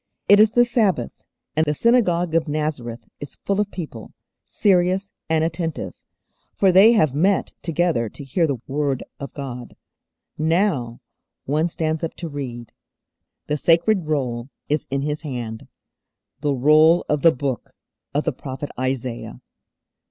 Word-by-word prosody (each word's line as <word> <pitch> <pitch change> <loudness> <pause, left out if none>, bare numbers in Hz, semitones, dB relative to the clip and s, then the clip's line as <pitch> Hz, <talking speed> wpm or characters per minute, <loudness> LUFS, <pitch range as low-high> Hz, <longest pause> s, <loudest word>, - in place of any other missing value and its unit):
It 205 +1 +7
is 215 0 +5
the 240 0 +5
Sabbath, 230 -6 0 0.3
and 155 - +3
the 150 -1 0
synagogue 180 - +2
of 165 -1 +2
Nazareth 145 -6 -3
is 145 - -9
full 200 +1 +1
of 205 - -2
people, 150 - -8 0.3
serious 190 0 +2 0.2
and 160 -1 +2
attentive, 165 -1 -3 0.6
for 195 -2 +4
they 200 +6 +7
have 155 - +3
met 185 +7 +2
together 165 -8 0
to 145 - -9
hear 160 +5 +1
the 140 -3 -1
Word 140 -1 -1 0.2
of 140 - -6
God. 125 -4 -7 0.6
Now 155 - 0 0.4
One 155 +4 +1
stands 160 -1 -2
up 165 - -3
to 170 - -6
read. 125 -6 -6 0.7
The 150 - -1
sacred 170 +3 +3
Roll 125 -5 -2 0.2
is 150 0 -1
in 135 0 -1
His 150 +1 -2
hand; 120 -7 -6 0.7
the 145 -1 0
Roll 155 +6 +5
of 150 -1 0
the 165 - +7
Book 130 -2 -3 0.4
of 145 +2 0
the 160 - -1
prophet 135 +2 -6
Isaiah. 130 - -3
155 Hz, 145 wpm, -22 LUFS, 135-175 Hz, 0.7 s, It